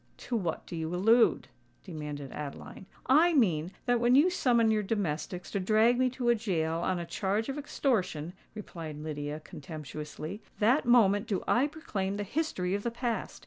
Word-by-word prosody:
"To 245 - -4
what 175 -8 -2
do - - -7
you 160 +1 -3
allude?" 225 +6 +4 0.4
demanded 150 -6 -6
Adeline. 150 +5 -8 0.2
"I 320 +6 +5
mean 175 - +2
that 245 -2 +2
when 240 +1 +4
you 315 +7 +5
summon 235 -9 +3
your 215 -1 +2
domestics 180 -4 -3
to 200 - -1
drag 220 +5 +3
me 255 0 +3
to 245 -2 +1
a - - +7
gaol 165 -7 -1
on 185 +1 0
a 170 - -4
charge 205 +7 -1
of 270 - -3
extortion," 185 - -1 0.2
replied 165 -7 -7
Lydia, 150 0 -5
contemptuously, 155 +5 -7 0.2
"that 240 +6 +3
moment 210 -4 +4
do 200 -5 -1
I 260 +4 +3
proclaim 205 -11 -4
the 205 - -2
history 200 - -2
of 200 - -1
the 235 - -1
past! 235 0 -3
200 Hz, 175 wpm, -30 LUFS, 165-240 Hz, 0.4 s, a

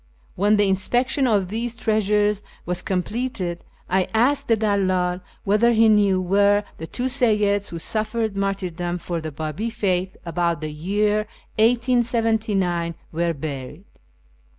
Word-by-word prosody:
When 205 +3 +3
the 205 -1 +3
inspection 245 +8 +1
of 200 -5 +1
these 230 +3 -3
treasures 210 -2 +1 0.2
was 180 +1 -1
completed, 190 -2 -2 0.2
I 185 0 +1
asked 260 +6 +2
the 225 - +3
dalldl 185 -4 +1 0.2
whether 215 +4 +3
he 225 0 +5
knew 200 -3 +4
where 200 +3 +3 0.2
the 160 - -6
two 245 - -5
Seyyids 210 -6 +2
who 170 - -6
suffered 215 +3 -2
martyrdom 180 -3 -2
for 170 -1 -4
the 155 0 -5
Babi 155 +9 -3
faith 190 -5 -1
about 170 -1 0
the 155 0 -4
year 205 +7 0 0.3
1879 225 -7 +1 0.2
were 170 +1 0
buried. 145 +2 -6
200 Hz, 130 wpm, -23 LUFS, 180-220 Hz, 0.3 s, he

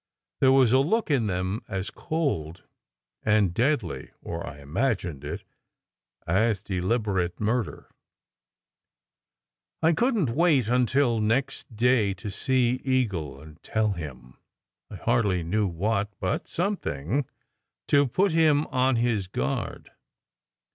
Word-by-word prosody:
There 130 - +5
was 130 -4 +5
a 130 - +5
look 175 +7 +1
in 125 -6 +2
them 95 +3 -2
as 95 +1 -4
cold 140 - -2 0.6
and 105 -4 +2
deadly 120 - 0
or - - -5
I 70 - -8
imagined 90 - -2
it - - -5 0.8
as 100 +3 +1
deliberate 95 -2 -1
murder. 110 +2 -2 1.9
I 165 +1 +5
couldn 230 - +2
t 120 - -2
wait 150 -5 +3
until 125 0 +2
next 115 +2 -1
day 115 -4 +3
to 100 +2 -6
see 125 +3 +1
Eagle 100 - -1
and 80 +2 -14
tell 110 -1 0
him 65 -9 -8 0.5
I - - -8
hardly 105 -4 +1
knew 100 +5 0
what, 100 +4 -1
but 90 - -2
something, 140 - -2 0.6
to 145 -1 +4
put 190 +9 +2
him 155 -2 +4
on 130 0 +2
his 115 -5 0
guard. 70 -6 -3
110 Hz, 120 wpm, -26 LUFS, 95-130 Hz, 1.9 s, There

